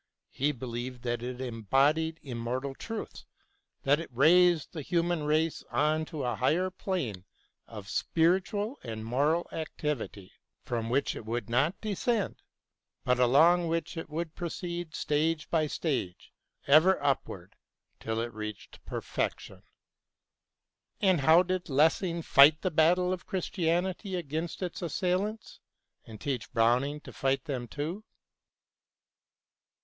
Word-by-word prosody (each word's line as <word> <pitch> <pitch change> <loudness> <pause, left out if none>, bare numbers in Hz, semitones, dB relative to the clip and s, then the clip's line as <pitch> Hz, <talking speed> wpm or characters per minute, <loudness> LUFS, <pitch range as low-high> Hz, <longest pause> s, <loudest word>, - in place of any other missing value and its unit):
He 145 +3 0
believed 125 -1 -6
that 120 -1 -2
it 125 +1 -5
embodied 135 +7 +1
imr 130 -3 -5
mortal 130 +4 -3
truthSj 225 +9 -7 0.6
that 145 +2 +3
it 165 - -6
raised 170 +6 +4
the 160 - -5
human 170 0 0
race 155 +2 +1
on 155 +1 +1
to 155 -4 -5
a 120 -1 0
higher 180 - +1
plane 160 - -3 0.4
of - - -9
spiritual 190 - 0
and 110 -2 -6
moral 145 +8 +1
activity, 150 - -4 0.3
from 115 -2 -3
which 135 +4 +1
it - - -7
would 115 0 -4
not 145 - +2
descend, 215 0 -1 0.6
but 125 0 +2
along 165 +8 +5
which 165 +2 -2
it 165 -1 -6
would 160 +1 -4
proceed 175 -1 -5
stage 155 +1 0
by 155 -2 +2
stage 130 - -3 0.3
ever 160 +7 +6
up 140 -2 +1
ward 90 0 -10 0.4
till 110 0 -2
it 120 0 -4
reached 110 -1 -8
perfection. - - -4 1.4
And 185 -4 +3
now 135 - -3
how 165 +3 +7
did 185 -1 -3
Lessing 165 +4 +2
fight 150 +2 +6
the 185 - 0
battle 175 +3 +3
of 180 - -7
Christianity 185 +1 -1
against 165 +2 -4
its 180 - -4
assailants, 185 +5 -2 0.5
and 110 -2 -11
teach 130 -5 -3
Browning 125 +6 +2
to - - -11
fight 135 -1 0
them 130 -5 -4
too 155 - -4
155 Hz, 135 wpm, -29 LUFS, 125-175 Hz, 1.4 s, how